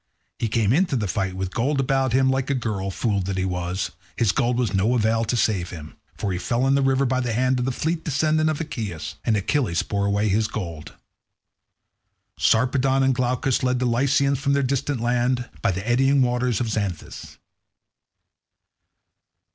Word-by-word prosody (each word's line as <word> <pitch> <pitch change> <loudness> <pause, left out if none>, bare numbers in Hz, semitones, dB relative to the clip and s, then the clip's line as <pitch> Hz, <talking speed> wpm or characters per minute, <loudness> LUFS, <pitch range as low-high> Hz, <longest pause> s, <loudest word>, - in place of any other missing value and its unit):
He 115 - 0
came 110 0 +1
into 170 -1 +2
the 110 -5 -1
fight 95 0 -2
with 95 0 -4
gold 135 +4 0
about 135 -1 +1
him, 130 +1 +3
like 135 +1 -1
a 140 - +1
girl; 105 -6 -2
fool 100 +1 -1
that 95 +1 -3
he 95 - 0
was, 90 0 -2 0.2
his 115 -5 +2
gold 120 +3 0
was 120 -5 0
of - - -2
no 110 +6 +2
avail 115 0 +2
to 120 +3 -1
save 95 -6 +1
him, 80 -2 -9 0.2
for 100 - -2
he 90 - -2
fell 120 +8 0
in 135 - +3
the 140 - +3
river 135 0 +2
by 130 0 +1
the 120 -3 -1
hand 130 +2 +1
of 125 - -1
the 130 - 0
fleet 160 +5 -2
descendant 155 +1 +1
of 155 - -2
Aeacus, 110 - -5
and 110 - +2
Achilles 100 - 0
bore 100 -1 -1
away 100 +1 +1
his 105 +2 +2
gold. 85 -8 -6 1.4
Sarpedon 130 +3 +2
and 135 0 +3
Glaucus 125 +1 0
led 125 0 +1
the 125 - -1
Lycians 135 +3 +2
from 140 -1 +1
their 140 0 +2
distant 135 -1 -1
land, 125 +1 0
by 115 - +2
the 95 +3 -3
eddying 135 +3 +3
waters 125 -2 0
of 120 - 0
the - - +1
Xanthus. 95 -6 -6
120 Hz, 195 wpm, -23 LUFS, 100-135 Hz, 1.4 s, him